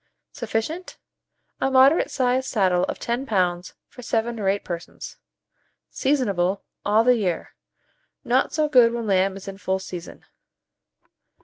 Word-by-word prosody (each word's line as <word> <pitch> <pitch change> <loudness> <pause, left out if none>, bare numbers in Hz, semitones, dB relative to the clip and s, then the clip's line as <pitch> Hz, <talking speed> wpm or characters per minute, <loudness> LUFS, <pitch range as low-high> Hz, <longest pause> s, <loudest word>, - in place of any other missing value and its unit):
Sufficient. 315 +11 -4 0.6
A 265 - +1
moderate 265 +4 +5
sized 255 0 0
saddle 185 -7 +2
of - - -5
10 240 +3 -3
lbs. 180 -4 0
for 250 - -13
7 230 0 -1
or 195 -2 +1
8 200 +1 -1
persons. 170 -1 -7 0.7
Seasonable 200 -9 0 0.2
all 215 +2 +3
the 250 0 +4
year; 185 -6 -2 0.7
not - - +1
so 310 -1 +1
good 245 -5 +5
when 235 -1 -3
lamb 195 -1 +1
is 195 - -11
in 195 0 -7
full 190 -1 -1
season. 180 -2 -9
220 Hz, 135 wpm, -23 LUFS, 190-255 Hz, 0.7 s, moderate